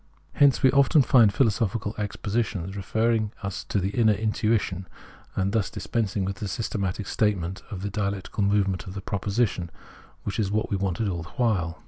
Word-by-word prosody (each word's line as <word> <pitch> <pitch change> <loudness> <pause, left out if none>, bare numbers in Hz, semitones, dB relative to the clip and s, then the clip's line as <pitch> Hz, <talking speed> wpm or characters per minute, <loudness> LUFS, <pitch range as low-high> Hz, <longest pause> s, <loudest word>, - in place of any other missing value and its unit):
Hence 140 -2 +4
we 130 - +7
often 140 +2 +5
find 115 -5 +6
philosophical 105 -1 +1
expositions 105 -2 -2
referring 110 +2 0
us 100 -2 -4
to - - -1
the 95 0 0
inner 110 0 +4
intuition, 105 -3 0 0.5
and 95 0 0
thus 110 -4 +1
dispensing 110 -4 -2
with 95 0 -3
the 105 - -4
systematic 100 -1 -2
statement 100 -3 0
of 95 -2 -6
the 100 - -3
dialectical 100 0 -2
movement 100 -2 +1
of 95 - -7
the 100 - -4
proposition, 100 -3 -1 0.5
which 100 - -3
is 100 -3 +1
what 110 +2 -1
we - - +2
wanted 95 +2 -1
all 85 -3 -2
the 85 - -9
while. 90 -9 +1
100 Hz, 170 wpm, -26 LUFS, 95-110 Hz, 0.5 s, we